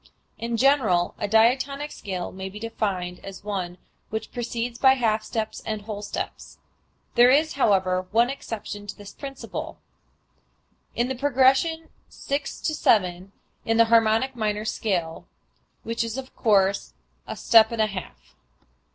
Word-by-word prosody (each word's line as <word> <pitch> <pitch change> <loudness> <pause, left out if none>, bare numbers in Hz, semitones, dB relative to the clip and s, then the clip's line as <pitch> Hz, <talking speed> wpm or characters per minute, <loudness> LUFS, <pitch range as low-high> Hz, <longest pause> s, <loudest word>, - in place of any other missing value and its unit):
In 230 0 -2
general 225 -10 +3
a 205 - -1
diatonic 260 +7 +2
scale 185 -3 -5
may 190 0 -6
be 200 - -10
defined 195 -5 -3
as 195 0 -9
one 185 -4 -4 0.3
which 220 0 -4
proceeds 240 0 -4
by 265 -1 +6
half 220 -4 +1
steps 220 0 -4
and 215 -1 -4
whole 210 -1 -6
steps. 205 - -6 0.6
There 240 +1 +6
is, 305 +4 +3
however, 185 -7 +2
one 235 +5 +3
exception 210 -5 -7
to 200 - -7
this 205 -1 -11
principle, 275 -1 -7 1.2
viz., - - +1
in 240 - +1
the 265 - -2
progression 275 +5 +2 0.2
six 280 0 -4
to 310 - -1
seven 185 -8 +2 0.3
in 225 0 +1
the 230 - +7
harmonic 225 +3 +3
minor 215 -2 -1
scale, 180 -7 -2 0.6
which 230 +1 -2
is 230 +1 -4
of 265 -1 -8
course 195 - +2 0.3
a - - -5
step 220 0 +5
and 230 - -4
a - - +3
half. 70 - -8
220 Hz, 150 wpm, -25 LUFS, 195-250 Hz, 1.2 s, the